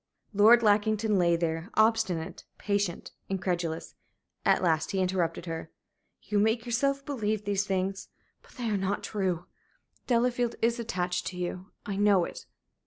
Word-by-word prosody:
Lord 225 +4 +7
Lackington 215 0 +3
lay 170 -1 +4
there, 165 +2 -2
obstinate, 205 -6 +1
patient, 200 -4 -2 0.2
incredulous. 175 -4 -2 0.5
At - - +3
last 160 -2 +2
he 195 - -1
interrupted 180 -2 0
her. 165 -1 -5 0.5
"You 210 -1 0
make 220 +3 +2
yourself 275 +3 0
believe 215 -6 -2
these 200 0 0
things. 190 0 -2 0.3
But - - -20
they 245 -2 -4
are 205 - +1
not 195 +1 -1
true. 185 -5 -2 0.6
Delafield 245 -1 +1
is 235 +1 +1
attached 180 -6 -2
to 180 - -5
you. 180 +2 -4 0.2
I 200 -2 -3
know 200 -3 +4
it." - - -9
200 Hz, 145 wpm, -29 LUFS, 180-220 Hz, 0.6 s, Lord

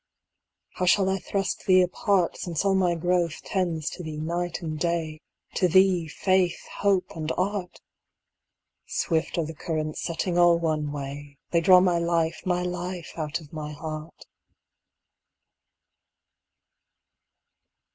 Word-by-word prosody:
How 180 - 0
shall 190 +1 +4
I 195 - 0
thrust 195 -1 -3
thee 185 -1 +6
apart 185 0 +1
Since 175 +1 -3
all 195 - +4
my 180 -2 +2
growth 175 -1 0
tends 170 -5 -1
to - - -7
thee 155 -3 -6
night 170 +3 -2
and 155 -2 -4
day 165 -2 -1 0.2
— - - -39
To 180 - +4
thee 185 -1 +4
faith, 185 +2 +1 0.2
hope, 195 -4 +1
and 160 -1 -3
art? 190 -1 -2 1.1
Swift 160 0 -1
are 165 - +1
the 160 - -6
currents 155 -1 -3
setting 175 +1 -1
all 175 -1 +6
one 155 -3 -1
way; 145 0 -7
They 170 - +3
draw 185 +1 +7
my 180 -2 +3
life, 170 -1 0
my 180 -1 +1
life, 180 -1 -4
out 160 +1 -3
of 150 -1 -16
my 150 -1 -5
heart. 155 +1 -7
170 Hz, 135 wpm, -26 LUFS, 155-180 Hz, 1.1 s, draw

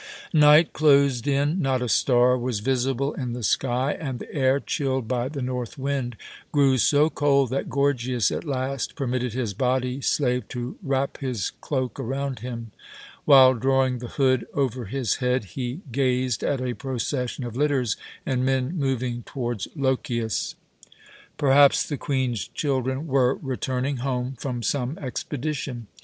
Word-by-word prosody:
Night 150 +1 +6
closed 140 -4 +3
in. 145 +6 +1
Not 130 -3 +1
a - - -2
star 125 +1 +4
was 125 -3 -2
visible 135 +3 0
in 125 -3 -4
the 120 -1 -5
sky, 130 +5 +1
and 135 -5 -4
the - - -10
air, 135 -1 +2
chilled 130 -4 -2
by 125 +1 -1
the 140 -3 -4
north 125 +1 -4
wind, 135 -4 -2 0.3
grew 135 -3 +3
so 145 +5 +4
cold 140 -3 +2
that 135 - -2
Gorgias 130 -4 +1
at - - -3
last 135 -3 -3
permitted 125 -3 -2
his 120 -5 -2
body 125 +3 0
slave 125 -5 0
to 125 +1 -5
wrap 140 -4 -1
his 125 -7 -2
cloak 130 -2 -2
around 135 +1 -3
him. 115 -2 -6 0.5
While 130 -3 +8
drawing 130 +1 +1
the 120 - -6
hood 130 0 +1
over 130 -3 -1
his 120 +1 -1
head, 125 -1 0
he 130 +5 -4
gazed 125 -2 0
at 140 -3 0
a 125 -1 -2
procession 130 0 -3
of 120 -2 -6
litters 135 -5 +1 0.3
and 130 -2 0
men 130 +4 0
moving 130 -5 -1
towards 120 -4 -4
Lochias. 125 -5 -1 0.8
Perhaps 140 0 +5
the 145 - -2
Queen's 130 -6 -1
children 130 0 -2
were 135 -3 +2
returning 130 0 -2
home 125 0 -2
from 125 -3 -4
some 130 +4 -1
expedition. 135 -2 -4
130 Hz, 150 wpm, -25 LUFS, 125-140 Hz, 0.8 s, While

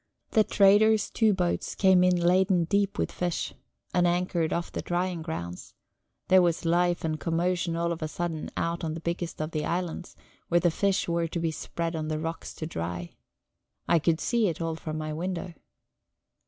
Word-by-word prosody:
The 215 - +5
trader's 210 +2 +4
two 220 -2 +3
boats 180 -3 -1
came 190 -2 +5
in 180 0 +4
laden 180 +1 +3
deep 200 +4 0
with - - -1
fish, 175 -2 -2 0.4
and 175 0 +3
anchored 175 -2 0
off 170 0 -2
the - - -3
drying 175 -1 -1
grounds; 90 - -6 0.5
there 185 0 +6
was 170 -1 +1
life 175 +1 +2
and 155 -1 -1
commotion 170 0 0
all 170 0 0
of 165 - -4
a 155 - -1
sudden 165 0 -4
out 170 +1 -1
on 160 -1 -2
the - - -5
biggest 170 +1 -4
of 155 +1 -3
the 155 -2 -2
islands, 175 0 -3 0.3
where 175 - +3
the 175 -1 +2
fish 195 +3 +1
were 170 0 0
to 170 - -4
be 165 -1 0
spread 165 +1 -4
on 155 -1 -3
the 155 0 -1
rocks 165 +1 -5
to 155 - -5
dry. 85 - -4 0.8
I 170 - +4
could 160 +1 +1
see 235 -3 +1
it 165 -2 -2
all 165 -1 -1
from 155 -1 -5
my 155 0 -3
window. 175 +2 -4
170 Hz, 190 wpm, -27 LUFS, 160-180 Hz, 0.8 s, there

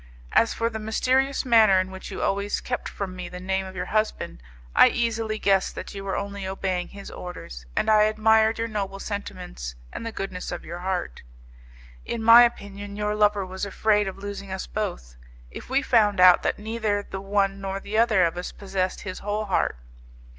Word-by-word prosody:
As 230 - +4
for 230 - -1
the 220 - -4
mysterious 260 +6 +1
manner 220 -6 +6
in 185 0 -2
which 190 0 -8
you - - -4
always 200 +1 0
kept 245 - -4
from 190 -2 -5
me 180 -1 -6
the 180 - -8
name 190 +1 -2
of 190 - -10
your 180 0 -3
husband, 215 - -2 0.3
I - - +8
easily 225 -2 -1
guessed 195 -2 +2
that - - -7
you 195 -1 -6
were 195 -1 -2
only 200 -1 -4
obeying 190 -2 -2
his 200 0 -10
orders, 60 - -8
and - - +1
I 215 -1 +6
admired 220 +1 +3
your 230 0 -1
noble 200 -3 -3
sentiments 60 - -6 0.2
and - - -5
the 230 - -4
goodness 190 -4 -5
of 175 - -6
your 170 +2 -6
heart. 180 - -3 0.8
In 230 -1 -4
my 230 +1 +10
opinion 205 -4 -1
your 210 0 -1
lover 210 -2 +2
was 190 +1 -7
afraid 210 +1 +2
of 190 - -5
losing 200 -1 -7
us 190 0 -4
both, 175 - -5 0.3
if - - -9
we 270 +2 +2
found 210 -6 +3
out 180 -1 +8
that - - 0
neither 215 -1 -1
the 190 - -7
one 195 0 0
nor 195 0 -3
the 210 +2 -2
other 215 -6 +4
of 170 +1 -2
us 180 - -4
possessed 190 -2 -3
his 185 -2 -6
whole 210 +1 -2
heart. 190 - 0
200 Hz, 195 wpm, -25 LUFS, 190-215 Hz, 0.8 s, my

